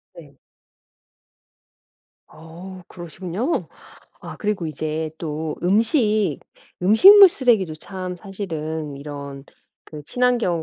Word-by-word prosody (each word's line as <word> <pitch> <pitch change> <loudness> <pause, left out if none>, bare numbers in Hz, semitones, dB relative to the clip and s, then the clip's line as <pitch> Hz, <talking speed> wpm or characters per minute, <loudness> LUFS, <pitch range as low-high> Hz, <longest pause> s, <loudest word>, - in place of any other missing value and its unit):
네. 145 -5 -15 1.9
어 170 +4 -12
그러시군요. 180 - -4 0.5
아 - - -9
그리고 205 -5 -2
이제 155 +1 -4
또 155 -1 -4
음식 210 - +1 0.4
음식물 385 - +8
쓰레기도 230 - +1
참 185 +2 -7
사실은 160 -6 -6
이런 140 -1 -8 0.4
그 150 -1 -10
친환경 240 -7 0
175 Hz, 185 characters per minute, -21 LUFS, 155-210 Hz, 1.9 s, 음식물